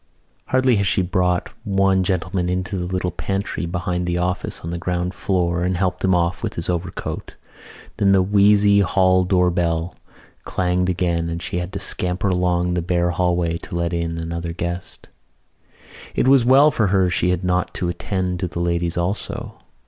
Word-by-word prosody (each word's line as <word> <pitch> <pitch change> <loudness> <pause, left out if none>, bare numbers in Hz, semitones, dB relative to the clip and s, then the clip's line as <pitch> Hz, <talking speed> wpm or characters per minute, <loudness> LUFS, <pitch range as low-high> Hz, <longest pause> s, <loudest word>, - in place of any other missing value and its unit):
Hardly 130 -2 +3
had 100 -1 +1
she 95 -1 +2
brought 90 0 0
one 95 -2 +2
gentleman 90 0 -1
into 90 +2 -2
the 90 -1 -3
little 90 -1 -1
pantry 95 0 -3
behind 90 0 -2
the 90 0 0
office 90 +1 -2
on 85 - -5
the 85 - -3
ground 90 +1 -2
floor 90 -3 0
and 90 0 0
helped 90 0 -1
him 95 -1 +3
off 85 0 0
with - - -4
his 85 - -3
overcoat 90 0 -5 0.6
than 100 -1 +3
the 95 -1 +5
wheezy 100 +1 +4
hall 95 -1 +3
door 90 -1 +3
bell 85 -1 -1 0.5
clanged 90 0 0
again 85 -2 0
and 85 0 -3
she 85 - -4
had 90 +1 -3
to 100 - -3
scamper 95 0 -2
along 90 -1 +1
the 90 - 0
bare 85 0 0
hallway 85 -1 0
to 85 - -8
let 85 0 -1
in 85 -1 -2
another 85 +1 -4
guest. 85 +1 -5 1.1
It - - +2
was 135 -2 +6
well 135 +5 +6
for 110 -6 +1
her 95 -1 +3
she 90 0 +1
had 90 0 0
not 90 0 0
to 90 - -2
attend 90 +1 -2
to 90 - -1
the 85 - -6
ladies 85 0 -1
also. 90 +4 -3
90 Hz, 180 wpm, -21 LUFS, 85-95 Hz, 1.1 s, was